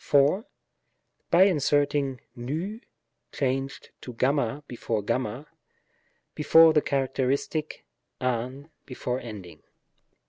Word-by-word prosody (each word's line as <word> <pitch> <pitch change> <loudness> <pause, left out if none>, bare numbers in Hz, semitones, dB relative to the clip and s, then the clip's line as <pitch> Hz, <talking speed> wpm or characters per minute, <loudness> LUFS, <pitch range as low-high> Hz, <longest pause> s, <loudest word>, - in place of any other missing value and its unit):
By 175 +2 +6
inserting 145 -6 +1
v 160 - -4 0.5
(changed 135 0 -2
to 125 - -9
y 140 0 +1
before 115 -3 -3
y), 125 +3 -2 0.9
before 160 +2 +6
the 150 - +4
characteristic, 140 +3 -1 0.3
av 130 +2 -2 0.2
before 125 -1 -3
ending: 95 -10 -9
§94. - - -35
135 Hz, 90 wpm, -26 LUFS, 125-150 Hz, 0.9 s, By